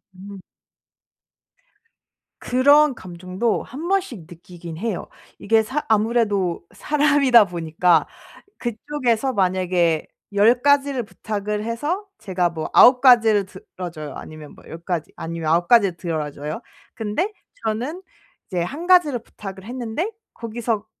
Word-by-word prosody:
음. 195 Hz, +1 st, -10 dB, 2.0 s
그런 285 Hz, +3 st, +4 dB
감정도 185 Hz, +4 st, -3 dB
1 305 Hz, +7 st, -7 dB
번씩 370 Hz, -, -1 dB
느끼기는 170 Hz, -1 st, -10 dB
해요. 225 Hz, -6 st, -3 dB, 0.3 s
이게 220 Hz, +2 st, +3 dB
사 265 Hz, +7 st, -3 dB
아무래도 210 Hz, -6 st, +1 dB
사람이다 285 Hz, -6 st, +4 dB
보니까 170 Hz, -1 st, +1 dB, 0.5 s
그쪽에서 250 Hz, +1 st, -1 dB
만약에 180 Hz, -4 st, +1 dB, 0.3 s
10 225 Hz, +5 st, +4 dB
가지를 280 Hz, -3 st, +2 dB
부탁을 210 Hz, 0 st, -4 dB
해서 295 Hz, -, -3 dB
제가 185 Hz, -4 st, -1 dB
뭐 160 Hz, -2 st, -5 dB
9 250 Hz, 0 st, +7 dB
가지를 225 Hz, -6 st, +5 dB
들어 185 Hz, -1 st, -9 dB
줘요. 155 Hz, -2 st, -8 dB
아니면 155 Hz, -1 st, -10 dB
뭐 -, -, -18 dB
10 165 Hz, -, -9 dB
가지 170 Hz, -2 st, -4 dB
아니면 165 Hz, -1 st, -3 dB
9 170 Hz, +1 st, +2 dB
가지를 205 Hz, -7 st, +4 dB
들어 160 Hz, -4 st, -3 dB
줘요. 150 Hz, +9 st, -6 dB, 0.3 s
근데 225 Hz, -, -2 dB, 0.3 s
저는 250 Hz, +11 st, -2 dB, 0.5 s
이제 180 Hz, -3 st, -2 dB
1 295 Hz, -, -5 dB
가지를 335 Hz, -9 st, +4 dB
부탁을 195 Hz, -4 st, -10 dB
했는데 245 Hz, -, -4 dB, 0.2 s
거기서 230 Hz, -2 st, -3 dB
215 Hz, 250 characters per minute, -22 LUFS, 175-255 Hz, 2.0 s, 9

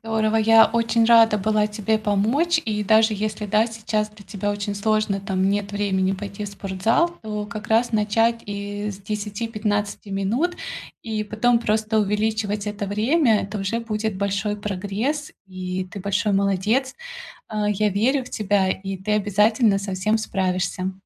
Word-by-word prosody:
Здорово. 220 Hz, 0 st, 0 dB
Я 225 Hz, 0 st, +6 dB
очень 230 Hz, 0 st, +1 dB
рада 225 Hz, -2 st, +6 dB
была 210 Hz, +1 st, +2 dB
тебе 215 Hz, +1 st, 0 dB
помочь. 235 Hz, -, +1 dB
И 210 Hz, -2 st, -1 dB
даже 220 Hz, +2 st, +4 dB
если, 210 Hz, 0 st, -3 dB
да, 215 Hz, +3 st, +3 dB
сейчас 215 Hz, -2 st, -2 dB
для 210 Hz, -1 st, -16 dB
тебя 205 Hz, 0 st, -3 dB
очень 205 Hz, 0 st, -3 dB
сложно, 215 Hz, -1 st, 0 dB
там 190 Hz, -1 st, 0 dB
нет 205 Hz, 0 st, -1 dB
времени 195 Hz, -2 st, 0 dB
пойти 200 Hz, +1 st, -6 dB
в -, -, -4 dB
спортзал, 200 Hz, -, 0 dB
то 210 Hz, -1 st, -4 dB
как 215 Hz, 0 st, -7 dB
раз 230 Hz, +2 st, +2 dB
начать 225 Hz, +2 st, +2 dB
и 205 Hz, +1 st, -4 dB
с 195 Hz, -, -8 dB
10-15 210 Hz, 0 st, -3 dB
минут, 220 Hz, -, -1 dB, 0.5 s
и 220 Hz, -2 st, -2 dB
потом 230 Hz, +3 st, +2 dB
просто 220 Hz, 0 st, 0 dB
увеличивать 210 Hz, 0 st, -1 dB
это 205 Hz, -1 st, -3 dB
время. 225 Hz, +3 st, +2 dB
Это 205 Hz, +1 st, -5 dB
уже 195 Hz, +4 st, -1 dB
будет 215 Hz, -2 st, -3 dB
большой 200 Hz, +1 st, -1 dB
прогресс, 210 Hz, +9 st, -3 dB
и 185 Hz, 0 st, -4 dB
ты 200 Hz, -, -7 dB
большой 200 Hz, +2 st, 0 dB
молодец. 200 Hz, +7 st, +1 dB, 0.5 s
А 210 Hz, -1 st, -1 dB
я 210 Hz, +1 st, +1 dB
верю 245 Hz, +7 st, +1 dB
в -, -, -12 dB
тебя, 200 Hz, -2 st, +1 dB
и 195 Hz, 0 st, -4 dB
ты 200 Hz, +3 st, -3 dB
обязательно 210 Hz, +1 st, +3 dB
со 195 Hz, -1 st, -4 dB
всем 215 Hz, +4 st, +1 dB
справишься. 185 Hz, -2 st, -1 dB
210 Hz, 160 wpm, -23 LUFS, 200-220 Hz, 0.5 s, Я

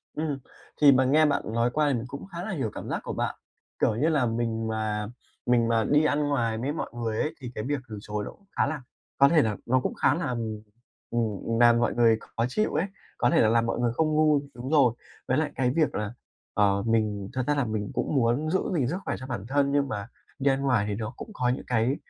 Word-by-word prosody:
Ừm, 150 Hz, -3 st, -2 dB, 0.4 s
thì 145 Hz, -1 st, +9 dB
mà 130 Hz, 0 st, +4 dB
nghe 155 Hz, +4 st, +5 dB
bạn 145 Hz, -1 st, +1 dB
nói 115 Hz, +1 st, +2 dB
qua 150 Hz, -1 st, +2 dB
thì 140 Hz, -, +2 dB
mình 115 Hz, 0 st, -2 dB
cũng 140 Hz, +2 st, -7 dB
khá 175 Hz, -2 st, -7 dB
là 215 Hz, -, -4 dB
hiểu 130 Hz, -, -2 dB
cảm -, -, -7 dB
giác -, -, -1 dB
của -, -, -4 dB
bạn. -, -, -2 dB, 0.4 s
Kiểu 110 Hz, -, +2 dB
như 150 Hz, +8 st, +2 dB
là, 145 Hz, -5 st, +2 dB
mình 115 Hz, -1 st, -1 dB
mà 110 Hz, -1 st, -2 dB, 0.4 s
mình 120 Hz, -1 st, +3 dB
mà 115 Hz, -1 st, +2 dB
đi 150 Hz, +5 st, +3 dB
ăn 150 Hz, 0 st, +2 dB
ngoài 115 Hz, -5 st, 0 dB
với 135 Hz, +6 st, -2 dB
mọi -, -, -4 dB
người 115 Hz, -2 st, -2 dB
ấy 155 Hz, -, -1 dB
thì 125 Hz, -1 st, -6 dB
cái 110 Hz, -, -3 dB
việc 145 Hz, +2 st, -1 dB
từ 105 Hz, -, -6 dB
chối 105 Hz, 0 st, -4 dB
nó -, -, -6 dB
cũng 200 Hz, -, -23 dB
khá -, -, +4 dB
là 150 Hz, -2 st, -3 dB, 0.4 s
có 140 Hz, 0 st, +6 dB
thể 160 Hz, -3 st, +5 dB
là 110 Hz, -2 st, 0 dB
nó 130 Hz, +2 st, +3 dB
cũng -, -, -2 dB
khá 130 Hz, -, +2 dB
là, 165 Hz, -6 st, -2 dB
ừm, 110 Hz, -3 st, -3 dB, 0.5 s
ừm, 115 Hz, 0 st, -1 dB
làm 120 Hz, 0 st, +6 dB
mọi 120 Hz, -, +1 dB
người 115 Hz, -2 st, +4 dB, 0.2 s
khó 115 Hz, -, +2 dB
chịu 215 Hz, +10 st, 0 dB
ấy, 160 Hz, +5 st, +1 dB, 0.3 s
có 120 Hz, -, +3 dB
thể -, -, +4 dB
là 110 Hz, -, +4 dB
làm 115 Hz, 0 st, +3 dB
mọi 115 Hz, -, -1 dB
người 120 Hz, -1 st, +2 dB
không 160 Hz, +4 st, +1 dB
vui 155 Hz, -2 st, +4 dB
đúng 125 Hz, +3 st, -6 dB
rồi. 135 Hz, -7 st, +4 dB, 0.3 s
Với 130 Hz, -, +2 dB
lại 155 Hz, -1 st, 0 dB
cái 125 Hz, -2 st, +1 dB
việc 160 Hz, -2 st, +2 dB
là, 105 Hz, +1 st, -3 dB, 0.4 s
ờ, 100 Hz, -1 st, +2 dB
mình 105 Hz, -3 st, 0 dB
thật 130 Hz, -1 st, -1 dB
ra 145 Hz, -, +2 dB
là 140 Hz, -3 st, +1 dB
mình 110 Hz, -2 st, -3 dB
cũng -, -, -1 dB
muốn 130 Hz, +5 st, +2 dB
giữ 190 Hz, -, +2 dB, 0.2 s
gìn 125 Hz, -4 st, +1 dB
sức 175 Hz, +6 st, -2 dB
khỏe -, -, -1 dB
cho 130 Hz, -, -8 dB
bản 110 Hz, -5 st, -4 dB
thân 140 Hz, +1 st, +2 dB
nhưng 140 Hz, -1 st, +2 dB
mà 105 Hz, -2 st, -4 dB, 0.3 s
đi 140 Hz, 0 st, +3 dB
ăn 135 Hz, -, -1 dB
ngoài 125 Hz, -7 st, +2 dB
thì 100 Hz, -, -1 dB
nó 110 Hz, +2 st, -4 dB
cũng -, -, -8 dB
có 125 Hz, -6 st, 0 dB
những 125 Hz, -, -2 dB
cái 120 Hz, +3 st, +1 dB
125 Hz, 260 wpm, -27 LUFS, 115-145 Hz, 0.5 s, thì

